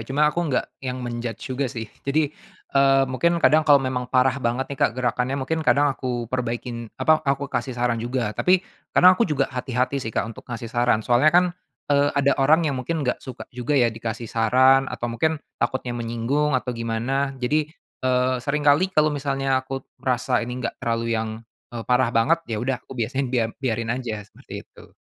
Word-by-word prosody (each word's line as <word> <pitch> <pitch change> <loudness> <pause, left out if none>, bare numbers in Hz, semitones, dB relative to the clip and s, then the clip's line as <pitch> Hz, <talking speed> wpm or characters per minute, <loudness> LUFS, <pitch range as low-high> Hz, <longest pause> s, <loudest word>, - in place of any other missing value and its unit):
cuma 135 +7 0
aku 170 - -1
nggak 130 - +1 0.2
yang 130 -1 -4
men-judge 120 +1 -5
juga 130 0 -1
sih. 115 -1 -5 0.2
Jadi, 150 +1 0 0.4
eee, 135 0 +5
mungkin 170 +7 +1
kadang 155 -1 +5
kalau 150 -2 +6
memang 130 -2 -2
parah 130 +1 +2
banget 125 +3 -1
nih, 135 - -7
Kak, - - +4
gerakannya, 125 +2 0
mungkin 160 +4 -2
kadang 145 -1 +3
aku 125 -2 -3
perbaikin 120 -1 -3
apa 155 0 +3
aku 140 -1 -1
kasih 130 -3 -2
saran 120 -1 0
juga. 120 -2 -2
Tapi 180 - +2 0.3
kadang 185 +1 +8
aku 230 +5 +1
juga 140 -2 0
hati-hati 125 +1 -1
sih, 115 - -4
Kak, 110 - -1
untuk - - -14
ngasih 115 -1 -6
saran. 120 -3 +2
Soalnya 125 +5 +4
kan, 175 +3 +5 0.5
eee, 140 0 +4
ada 140 0 +4
orang 155 +5 +4
yang 140 -4 -1
mungkin 155 +2 -2
nggak 125 - -1
suka 130 - -8
juga 125 +4 -1
ya 120 -4 +3
dikasih 115 +1 -5
saran 130 +4 +4
atau 120 -1 -5
mungkin 160 +7 +1 0.2
takutnya 130 -2 -1
menyinggung 120 +5 0
atau 125 0 -3
gimana. 120 +4 -2
Jadi, 150 +4 0 0.3
eee, 130 0 +2
seringkali 150 +6 +2
kalau 155 0 +4
misalnya 135 -2 0
aku 135 0 -6 0.2
merasa 125 0 0
ini 125 +1 -5
gak - - -1
terlalu 115 0 -1
yang, 110 - -3 0.4
eee, 115 -2 -7
parah 125 0 +3
banget, 120 +9 +2
ya 110 - -2
udah 130 0 -1
aku 130 - -12
biasanya 130 +4 -1
biar 120 -3 +1
biarin 115 -2 -1
aja 115 -5 -4
seperti 105 - -11
itu. - - -18
130 Hz, 190 wpm, -23 LUFS, 120-140 Hz, 0.5 s, kadang